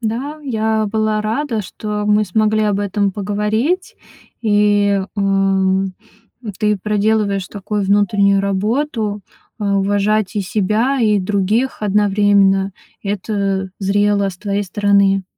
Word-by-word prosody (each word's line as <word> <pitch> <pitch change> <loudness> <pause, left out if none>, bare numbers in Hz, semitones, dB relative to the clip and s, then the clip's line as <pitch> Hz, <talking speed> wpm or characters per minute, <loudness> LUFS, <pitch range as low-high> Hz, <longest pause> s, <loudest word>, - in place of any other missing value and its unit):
Да, 250 +7 -3
я 220 -4 0
была 215 0 0
рада, 225 0 -2
что 210 +2 -5
мы 210 0 +3
смогли 215 +2 +1
об 205 -1 +1
этом 200 0 0
поговорить. 210 - -1 0.5
И, 205 -2 +2
м, 195 -1 +1 0.6
ты 210 -1 +1
проделываешь 210 -1 0
такую 205 +1 -3
внутреннюю 200 0 +3
работу: 210 +2 -1 0.4
а, 200 -2 0
уважать 205 +1 0
и - - +1
себя, 215 +8 0
и 210 -3 +3
других 205 +6 0
одновременно. 200 -1 +2 0.3
Это 195 -1 -2
зрело 200 0 +1
с 185 - -8
твоей 205 0 -2
стороны. 200 0 +2
205 Hz, 115 wpm, -18 LUFS, 195-215 Hz, 0.6 s, мы